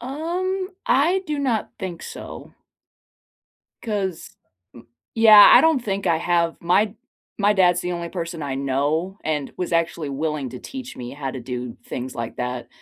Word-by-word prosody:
Um, 355 +8 -3 0.2
I 320 +8 +3
do 300 -1 -2
not 245 -6 -1
think 180 -3 -6
so. - - -9 1.3
'Cause 195 -6 -3 0.4
m 120 -1 -14 0.3
Yeah, 215 -2 +9
I - - +9
don't 320 -4 +3
think 195 -3 -3
I 165 - +3
have. 170 -1 +1
My 195 +5 +2 0.4
my 205 0 +4
dad's 180 -3 +3
the 180 0 -3
only 170 -1 -4
person 165 -2 -5
I 135 -2 -3
know 145 +8 -1
and 150 -3 -2
was 180 -1 -3
actually 165 -2 0
willing 145 -1 -3
to 125 - -9
teach 265 -1 -8
me 120 -1 -7
how 140 -2 -5
to 130 - -6
do 125 -1 -6
things 130 +1 -6
like 115 -1 -5
that 125 0 -4
175 Hz, 165 wpm, -22 LUFS, 140-220 Hz, 1.3 s, Yeah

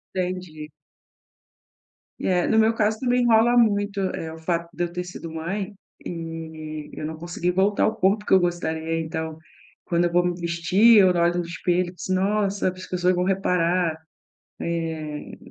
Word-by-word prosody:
Entendi. 180 -4 -4 1.5
É, 180 -2 +1
no 220 - +2
meu 220 +1 +4
caso 215 0 0
também 245 0 +2
rola 230 +1 +5
muito, 205 -3 +2 0.2
eh, 160 0 -5
o 160 - -10
fato 170 +1 -2
de 175 - -1
eu 170 - -3
ter 180 +1 -3
sido 175 -2 -8
mãe 190 +6 -4 0.3
e 160 -2 -6
eu - - -5
não 160 +1 -4
conseguir 175 +1 -2
voltar 195 +3 +2
ao 220 - +2
corpo 205 +3 +1
que - - +1
eu 190 - +8
gostaria, 165 -2 -1
então, 160 0 -4 0.5
quando 170 0 +1
eu 175 - 0
vou 175 +1 +3
me 180 - +1
vestir 175 +7 +4
eu 190 -2 +7
olho 175 0 +2
no 175 - -1
espelho, 175 +1 -1
eu - - -21
disse: 185 - -5
"Nossa, 200 0 +1
as 185 0 -9
pessoas 180 0 +1
vão 180 0 0
reparar" 180 -3 +1 0.6
eh, 160 -3 -4
175 Hz, 170 wpm, -24 LUFS, 165-195 Hz, 1.5 s, eu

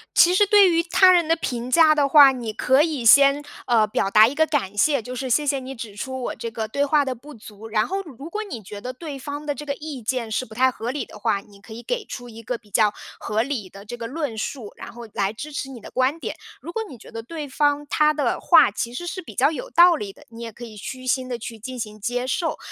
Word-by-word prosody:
其 350 - +6
实 405 +2 +4
对 400 -2 +6
于 335 0 +3
他 370 +2 +5
人 345 -3 +3
的 330 - +3
评 245 -6 -4
价 315 +2 +6
的 285 -2 +1
话， 285 -2 +8
你 240 -4 -5
可 260 +6 +3
以 300 -7 -1
先， 280 +4 +6 0.2
呃， 230 -3 +4
表 210 -2 -1
达 215 +2 +7
一 255 - -3
个 315 +2 +2
感 255 -11 -1
谢， 280 +6 +3
就 250 +3 -7
是： 260 +1 -4
“谢 295 +5 +2
谢 280 -1 +1
你 265 +1 -8
指 225 -4 -8
出 260 +5 -5
我 - - -3
这 230 - -5
个 220 -1 -4
对 280 +6 -1
话 285 0 +2
的 260 - -2
不 285 +5 -13
足。” 215 0 -12
然 215 0 +1
后， 390 +1 -2
如 305 -2 -11
果 430 - -3
你 240 - -8
觉 205 +1 -9
得 250 - -5
对 285 0 -8
方 290 +2 -6
的 290 - -1
这 295 - -8
个 280 -1 -3
意 295 -4 -7
见 230 0 -2
是 255 - -1
不 220 -3 -12
太 260 +1 +3
合 235 -1 -5
理 275 +2 -3
的 - - -13
话， 200 - 0
你 200 0 -19
可 220 - -16
以 230 +2 -8
给 - - -2
出 245 -10 -8
一 225 0 -11
个 235 +2 -4
比 215 -3 -25
较 210 +1 +3 0.3
合 220 +2 -1
理 245 -8 -4
的 200 +1 -13
这 240 +3 -6
个 235 -1 -6
论 290 -2 -4
述， 230 -3 -5
然 - - -9
后 235 0 -10
来 200 0 0
支 295 +7 -8
持 270 - -4
你 255 -3 -9
的 - - -12
观 260 +5 0
点。 - - -5 0.2
如 335 - -8
果 450 - -2
你 260 - -10
觉 - - -15
得 230 0 -6
对 300 +5 -7
方 290 +1 +1
他 305 +1 +3
的 300 -1 -1
话 - - +6
其 235 - -4
实 350 +8 -6
是 370 +2 -5
比 330 - -12
较 300 - +3
有 - - -6
道 350 0 +6
理 205 -10 -5
的， - - -19
你 230 0 -11
也 230 -1 -6
可 240 +3 -10
以 220 - -11
虚 255 +5 -8
心 255 0 0
地 245 - -3
去 230 0 -8
进 255 +3 -7
行 215 -1 -6
接 245 +3 -2
受。 320 +6 -1
255 Hz, 300 characters per minute, -23 LUFS, 225-300 Hz, 0.3 s, 话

